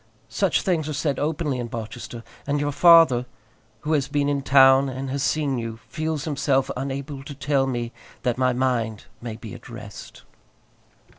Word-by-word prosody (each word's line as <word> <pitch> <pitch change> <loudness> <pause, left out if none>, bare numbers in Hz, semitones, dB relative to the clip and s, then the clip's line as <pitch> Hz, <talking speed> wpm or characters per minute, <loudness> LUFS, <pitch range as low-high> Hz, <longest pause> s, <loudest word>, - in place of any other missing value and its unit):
Such - - +1
things 165 -5 0
are - - -2
said 145 -2 -1
openly 150 -3 -1
in 120 - -3
Barchester, 115 +1 -7 0.2
and 145 0 +1
your 145 0 0
father, 165 -6 +6 0.5
who 155 - -1
has 140 -3 +1
been 145 0 0
in 140 -1 0
town 135 0 +6
and 130 +1 -5
has 140 0 -2
seen 140 -3 0
you, 115 -1 -5
feels 155 -2 -2
himself 140 -4 +1
unable 135 +1 -4
to 140 0 -8
tell 140 -1 +1
me 120 -2 -2 0.3
that 125 -2 +1
my 130 -1 +3
mind 120 -4 -1 0.2
may 115 -2 -5
be 110 -2 -9
at - - -11
rest. 110 -3 -10
135 Hz, 170 wpm, -24 LUFS, 125-145 Hz, 0.5 s, father